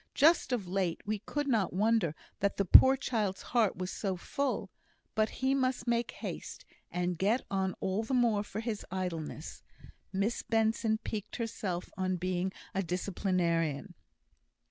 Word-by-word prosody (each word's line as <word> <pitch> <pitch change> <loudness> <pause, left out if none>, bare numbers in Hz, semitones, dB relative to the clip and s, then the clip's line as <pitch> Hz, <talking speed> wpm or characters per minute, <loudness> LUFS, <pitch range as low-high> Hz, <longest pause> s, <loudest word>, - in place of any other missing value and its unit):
Just 310 -3 +5
of 225 -7 -1
late 185 -2 0
we 210 0 -1
could 290 +7 -3
not 225 -8 +2
wonder 205 -5 +2 0.2
that 200 0 0
the 200 - +1
poor 265 +9 +9
child's 215 -7 -1
heart 230 -5 +3
was 185 0 -4
so 190 -3 -2
full; 235 -1 -2 0.4
but 215 0 +2
he 265 +1 0
must 260 -3 0
make 235 -1 +1
haste, - - -7 0.2
and 180 -1 -1
get 220 +7 +2
on 190 -1 0
all 190 +3 0
the 225 +4 -1
more 235 -4 +3
for 210 +1 -5
his 225 -3 -3
idleness." 170 -4 -4 0.5
Miss 200 +4 0
Benson 225 0 +1
piqued 215 -2 -5
herself 200 -6 -3
on 185 0 +1
being 180 +1 -1 0.2
a 195 - +1
disciplinarian. 175 -4 0
200 Hz, 150 wpm, -32 LUFS, 185-230 Hz, 0.5 s, poor